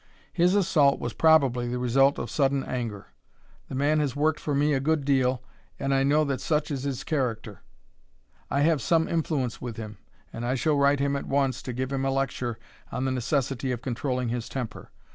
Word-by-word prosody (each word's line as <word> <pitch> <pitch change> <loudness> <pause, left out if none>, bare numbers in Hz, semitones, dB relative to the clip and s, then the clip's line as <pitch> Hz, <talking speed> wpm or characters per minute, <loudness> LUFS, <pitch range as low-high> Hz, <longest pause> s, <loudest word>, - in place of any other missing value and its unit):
His 180 +2 +3
assault 155 -8 +3
was 120 - -4
probably 135 -7 +4
the 125 - -2
result 135 +3 +3
of - - -5
sudden 135 -2 +1
anger. 115 -5 -5 0.6
The - - -5
man 145 +3 +2
has 145 -4 -1
worked 155 +1 +1
for 145 - -2
me 145 +2 +2
a 135 - +2
good 150 +1 0
deal, 130 -2 +2 0.3
and 135 0 -1
I 135 - +3
know 145 +3 +3
that 135 -3 -2
such 150 +1 0
is 135 -3 -2
his 135 -1 -3
character. 115 -8 -2 0.9
I 140 - +1
have 155 -2 +3
some 165 +6 +2
influence 150 -7 -1
with 120 -3 -6
him, 105 -3 -7 0.3
and 115 - -5
I 125 +2 0
shall 150 +3 +1
write 140 0 +3
him 140 0 +1
at 140 - -4
once 135 -1 0
and 125 -1 -4
give 130 +1 -2
him 135 0 -1
a 135 - +1
lecture 130 -3 -2 0.3
on 130 - -2
the 130 - 0
necessity 130 0 -1
of 120 -1 -4
controlling 125 -1 -2
his 120 0 -3
temper. 125 -5 -6
135 Hz, 200 wpm, -26 LUFS, 125-145 Hz, 0.9 s, probably